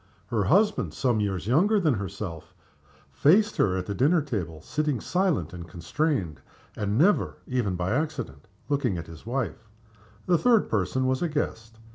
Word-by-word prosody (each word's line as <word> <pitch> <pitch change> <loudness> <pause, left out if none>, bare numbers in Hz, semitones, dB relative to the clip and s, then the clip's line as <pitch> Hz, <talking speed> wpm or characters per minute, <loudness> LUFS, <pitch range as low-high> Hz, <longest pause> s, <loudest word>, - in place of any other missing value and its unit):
Her 110 -4 0
husband, 205 - +2
some 125 -5 +1
years 95 -3 -2
younger 185 - +3
than 160 -7 +2
herself, 95 -5 -6 0.6
faced 195 - +3
her 95 -2 +2
at 90 - -3
the 140 - +2
table, 90 - -4
sitting 150 - -1
silent 175 - 0
and 85 -1 -8
constrained, 85 - -2 0.3
and 105 0 -1
never, 185 +9 +3
even 120 -8 -1
by 90 +2 -2
accident, 125 - -3 0.2
looking 135 -10 0
at 85 - -5
his 80 +5 -13
wife. 120 -3 -3 0.6
The 175 -2 +3
third 235 -4 +3
person 110 +5 0
was 130 0 0
a 175 - 0
guest. 115 -7 -3
115 Hz, 155 wpm, -26 LUFS, 95-155 Hz, 0.6 s, younger